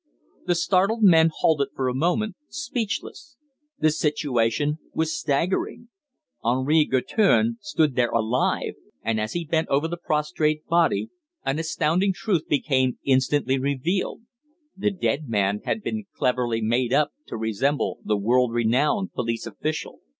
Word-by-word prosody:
The 175 - +3
startled 195 +6 +2
men 165 -4 +7
halted 155 -3 +1
for 130 - -1
a 125 - 0
moment, 180 - 0
speechless. 285 -1 -4 0.4
The 155 0 +3
situation 150 -2 0 0.2
was 160 0 0
staggering. 175 +10 -1 0.5
Henri 130 +6 +3
Guertin 220 - +2
stood 160 -8 +1
there 120 -1 +2
alive, 115 +2 0 0.3
and 110 0 0
as 110 - -3
he 175 -1 -2
bent 160 +1 0
over 140 +4 +1
the 175 +1 -4
prostrate 150 0 0
body 170 +5 +2 0.4
an 135 +3 0
astounding 165 +4 +1
truth 180 -4 -1
became 130 -3 +1
instantly 135 0 +2
revealed: 140 - -1 0.5
the 195 - 0
dead 155 - -2
man 105 -1 +1
had 220 - -2
been 220 -2 -3
cleverly 120 -3 0
made 120 +2 +1
up 145 +2 +3 0.2
to - - -5
resemble 110 -1 -1
the 105 - 0
world 120 +3 +2
renowned 135 - +1
police 115 -1 -2
official. 155 0 -4
150 Hz, 135 wpm, -24 LUFS, 125-175 Hz, 0.5 s, men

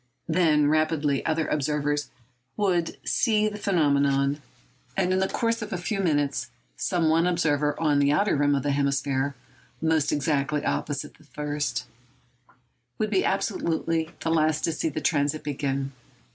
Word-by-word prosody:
Then 160 -3 +3
rapidly 155 -2 +1
other 160 0 0
observers 145 -1 -1 0.5
would 180 -5 0
see 215 -2 +2
the 210 0 -5
phenomenon; 140 -6 +2 0.6
and 185 -1 +2
in 185 - +2
the 190 - +2
course 230 +2 -1
of 215 0 -5
a 190 - -1
few 195 +4 -3
minutes 145 -7 0 0.3
some 175 -3 0
one 165 +2 +3
observer 150 -4 +1
on 150 -3 +2
the 140 0 +3
outer 195 +6 +2
rim 145 0 +3
of 135 - -1
the 145 - 0
hemisphere—almost 140 +2 -1
exactly 145 0 0
opposite 145 -2 -3
the - - -19
first—would 125 - -6
be 195 - +2
absolutely 165 -5 0
the 165 - -1
last 155 -1 +2
to 165 - +1
see 160 0 -1
the 155 +1 -4
transit 145 0 0
begin. 135 -1 -2
150 Hz, 145 wpm, -26 LUFS, 140-165 Hz, 0.6 s, Then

